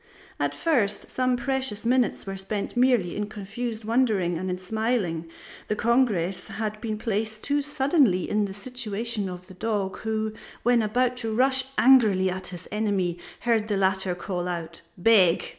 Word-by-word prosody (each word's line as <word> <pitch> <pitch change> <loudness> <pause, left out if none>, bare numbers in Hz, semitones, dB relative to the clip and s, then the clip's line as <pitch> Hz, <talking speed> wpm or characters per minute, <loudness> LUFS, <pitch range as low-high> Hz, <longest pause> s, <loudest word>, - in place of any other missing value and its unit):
At - - 0
first 245 -12 0
some 255 -1 +1
precious 260 -5 -1
minutes 250 0 +1
were 195 0 -4
spent 200 +3 -4
merely 245 -8 +3
in 210 0 -2
confused 215 +2 -5
wondering 215 -7 +2
and 185 +3 -3
in 180 - -2
smiling; 185 -4 -1 0.4
the 210 - 0
congress 215 -7 +1
had 215 -1 -4
been 220 -3 -3
placed 215 0 -2
too 290 +1 +1
suddenly 270 - +2
in 210 0 +1
the 195 - -6
situation 225 -2 -3
of 180 0 -8
the 185 - -13
dog 200 -1 -2
who, 220 0 -2 0.3
when 240 0 +4
about 245 +4 +1
to 225 -3 -2
rush 260 +3 +2
angrily 215 -8 +5
at 185 +1 -5
his 180 -1 -8
enemy, 195 -5 0 0.2
heard 225 -3 +1
the 205 -2 0
latter 190 -1 +1
call 180 -1 -3
out: 170 -2 -5 0.2
Beg! 185 -3 +5
215 Hz, 160 wpm, -26 LUFS, 190-240 Hz, 0.4 s, angrily